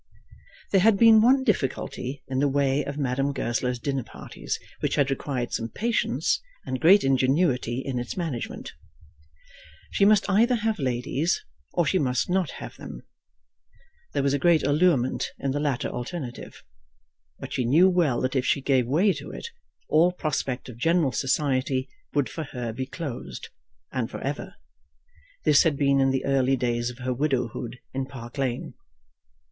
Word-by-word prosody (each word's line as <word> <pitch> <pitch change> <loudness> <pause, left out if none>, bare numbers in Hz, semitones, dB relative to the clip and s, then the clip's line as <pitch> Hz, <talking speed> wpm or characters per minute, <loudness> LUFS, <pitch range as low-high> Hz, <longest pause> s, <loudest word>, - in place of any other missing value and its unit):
There 195 - +4
had 215 0 +5
been 225 0 +7
one 265 +4 +5
difficulty 135 - -2
in 130 0 -1
the 145 - +3
way 140 0 +1
of 140 +1 -5
Madame 135 0 0
Goesler's 125 -1 -1
dinner 135 +2 -2
parties - - -6 0.2
which - - 0
had 140 -1 +2
required 130 -3 -3
some 115 0 -2
patience 230 - 0 0.2
and 130 - -3
great 190 +5 +7
ingenuity 130 -1 +1
in 130 -3 -2
its 120 +7 -5
management. 160 -10 -4 1.2
She - - +1
must 205 0 +5
either 225 +5 +3
have 220 -2 -1
ladies, 130 +4 -1 0.3
or 175 - +2
she 190 - +2
must 125 +1 0
not 185 -5 +1
have - - -9
them. - - -9 1.1
There 140 - 0
was 140 0 +2
a 145 - +1
great 165 +1 +4
allurement 145 -4 +2
in 135 - -2
the 145 - -1
latter 140 -5 -1
alternative; 125 0 -6 0.7
but - - -8
she 130 - 0
knew 155 +10 +5
well 170 -9 +2
that 130 +1 -1
if 130 - +2
she 140 - +1
gave 130 -3 +1
way 180 - +3
to 145 -1 -8
it, - - -7 0.4
all 165 +4 +4
prospect 150 -7 -3
of 120 -3 -10
general 165 0 +2
society 130 -1 0 0.3
would 145 -3 +2
for 160 - -5
her 120 -4 -5
be 130 +3 -4
closed, 130 - -6 0.4
and 125 -4 -2
for - - -7
ever. 150 +8 -4 0.9
This 145 - +6
had 155 -4 +2
been 140 -1 +3
in 135 0 +4
the 135 0 -1
early 135 -1 +2
days 120 -1 -1
of 120 - -9
her 130 0 -2
widowhood 125 -3 -2 0.2
in 130 0 -2
Park 130 -1 -9
Lane. 130 -3 -2
135 Hz, 165 wpm, -26 LUFS, 125-165 Hz, 1.2 s, been